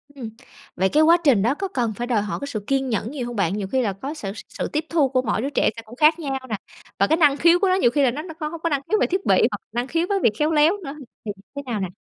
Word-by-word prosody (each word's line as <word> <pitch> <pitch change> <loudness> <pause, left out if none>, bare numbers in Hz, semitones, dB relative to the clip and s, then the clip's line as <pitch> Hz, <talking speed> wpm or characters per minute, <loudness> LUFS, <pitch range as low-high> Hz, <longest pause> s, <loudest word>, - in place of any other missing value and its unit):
Ừm. 245 -5 -6 0.5
Vậy 190 +1 +1
cái 310 +1 +4
quá 335 +2 +6
trình 265 -10 +4
đó 235 +6 +2
có 390 +5 -4
cần 240 - -2
phải 240 +3 -5
đòi 225 -5 +1
hỏi 210 - -4
cái 280 - -5
sự 245 -7 -3
kiên 270 -1 0
nhẫn 225 +1 -2
nhiều 260 -5 -4
hông 240 - -6
bạn? 190 -3 0
Nhiều 195 -2 -3
khi 260 +4 0
là 205 -5 -1
có 270 +10 -6
s 305 - -9 0.2
sự - - -4
tiếp 305 +1 -2
thu 305 -5 +2
của 255 -1 +1
mỗi 215 -3 -1
đứa 275 - -2
trẻ 290 - +2
sẽ 230 - -7
cũng 230 +3 -12
khác 310 +4 +4
nhau 275 -4 -3
nè, 215 - -1 0.4
và - - +4
cái 320 - +2
năng 290 -4 +4
khiếu 340 +3 +5
của 390 - +2
nó 370 - +3
nhiều 305 -11 +3
khi 285 +2 +2
là 255 - +3
nó 285 +5 -5 0.2
có 305 - -2
hông 330 +1 -7
có 335 - 0
năng 285 -3 0
khiếu 430 - +2
về - - +3
thiết 375 +2 -2
bị - - +4 0.2
hoặc - - -5
năng 240 +3 -2
khiếu 330 +4 0
với 400 -1 +1
việc 215 - +5
khéo 300 +2 +2
léo 315 +5 +4
nữa, 280 -1 -6 0.3
thì 210 - -2 0.2
thế 280 - -4
nào 235 -4 -3
nè? 190 - -2
275 Hz, 325 wpm, -22 LUFS, 235-315 Hz, 0.5 s, quá